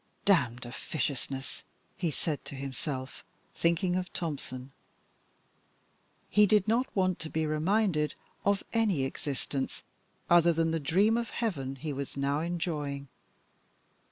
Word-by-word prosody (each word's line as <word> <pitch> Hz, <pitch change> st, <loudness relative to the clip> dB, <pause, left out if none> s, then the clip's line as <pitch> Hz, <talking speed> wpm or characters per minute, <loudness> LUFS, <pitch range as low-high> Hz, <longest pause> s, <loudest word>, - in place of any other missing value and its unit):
"Damned 125 Hz, -, +3 dB
officiousness!" 135 Hz, +1 st, -3 dB, 0.3 s
he 175 Hz, -, 0 dB
said 150 Hz, 0 st, -2 dB
to -, -, -7 dB
himself, 135 Hz, -1 st, -5 dB, 0.3 s
thinking 170 Hz, +2 st, +2 dB
of 180 Hz, 0 st, -2 dB
Tompson. 135 Hz, -5 st, -4 dB, 1.6 s
He 210 Hz, 0 st, +5 dB
did 210 Hz, -1 st, +4 dB
not 240 Hz, +4 st, +3 dB
want 185 Hz, -2 st, +2 dB
to 160 Hz, -, -4 dB
be 160 Hz, 0 st, 0 dB
reminded 155 Hz, 0 st, +2 dB, 0.3 s
of 200 Hz, 0 st, +2 dB
any 210 Hz, -, +3 dB
existence 135 Hz, 0 st, -3 dB, 0.4 s
other 170 Hz, 0 st, +6 dB
than 165 Hz, 0 st, +2 dB
the 165 Hz, -, +1 dB
dream 195 Hz, +10 st, +3 dB
of 235 Hz, -1 st, -1 dB
heaven 140 Hz, -, -2 dB
he 145 Hz, +2 st, -4 dB
was 140 Hz, 0 st, -5 dB
now 140 Hz, +1 st, +1 dB
enjoying. 155 Hz, -5 st, -2 dB
160 Hz, 125 wpm, -30 LUFS, 140-185 Hz, 1.6 s, other